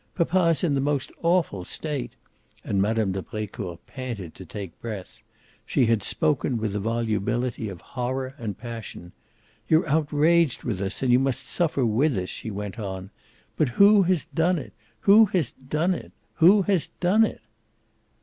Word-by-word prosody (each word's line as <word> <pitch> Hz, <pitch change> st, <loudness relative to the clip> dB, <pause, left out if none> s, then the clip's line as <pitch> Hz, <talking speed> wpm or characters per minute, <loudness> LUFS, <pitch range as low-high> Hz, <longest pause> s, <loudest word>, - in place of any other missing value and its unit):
Papa's 170 Hz, -1 st, +2 dB
in 160 Hz, -5 st, +2 dB
the 135 Hz, -, +1 dB
most 140 Hz, -1 st, -1 dB
awful 170 Hz, -, +1 dB
state!" 145 Hz, -, -4 dB, 0.5 s
and 100 Hz, -, 0 dB
Mme. 110 Hz, -1 st, +1 dB
de 95 Hz, 0 st, -3 dB
Brecourt 100 Hz, -5 st, -6 dB
panted 115 Hz, -10 st, -6 dB
to -, -, -11 dB
take 100 Hz, -4 st, -8 dB
breath. 105 Hz, -5 st, -7 dB, 0.4 s
She 130 Hz, -, +2 dB
had 115 Hz, -2 st, +2 dB
spoken 135 Hz, +3 st, 0 dB
with 110 Hz, -2 st, -2 dB
the 105 Hz, -, -1 dB
volubility 115 Hz, +1 st, -1 dB
of 90 Hz, -3 st, -9 dB
horror 130 Hz, +1 st, -4 dB
and 110 Hz, -4 st, -4 dB
passion. 115 Hz, -7 st, -8 dB, 0.6 s
"You're 160 Hz, +1 st, +3 dB
outraged 155 Hz, 0 st, +2 dB
with 100 Hz, -6 st, -2 dB
us 100 Hz, +6 st, -2 dB
and 130 Hz, -, +3 dB
you 125 Hz, -, +6 dB
must 135 Hz, -1 st, -1 dB
suffer 155 Hz, -7 st, 0 dB
with 120 Hz, +3 st, +2 dB
us," 90 Hz, 0 st, -3 dB
she -, -, -6 dB
went 105 Hz, +2 st, -5 dB
on. 95 Hz, -1 st, -5 dB, 0.5 s
"But 150 Hz, -, +2 dB
who 200 Hz, -, +6 dB
has 180 Hz, -4 st, +1 dB
done 175 Hz, +2 st, +1 dB
it? 120 Hz, -10 st, -7 dB, 0.3 s
Who 215 Hz, +3 st, +7 dB
has 180 Hz, -, 0 dB
done 155 Hz, +7 st, -1 dB
it? -, -, -7 dB, 0.3 s
Who 190 Hz, +4 st, +6 dB
has 190 Hz, -4 st, +1 dB
done 195 Hz, +5 st, +2 dB
it?" -, -, -2 dB
125 Hz, 165 wpm, -25 LUFS, 105-160 Hz, 0.6 s, Who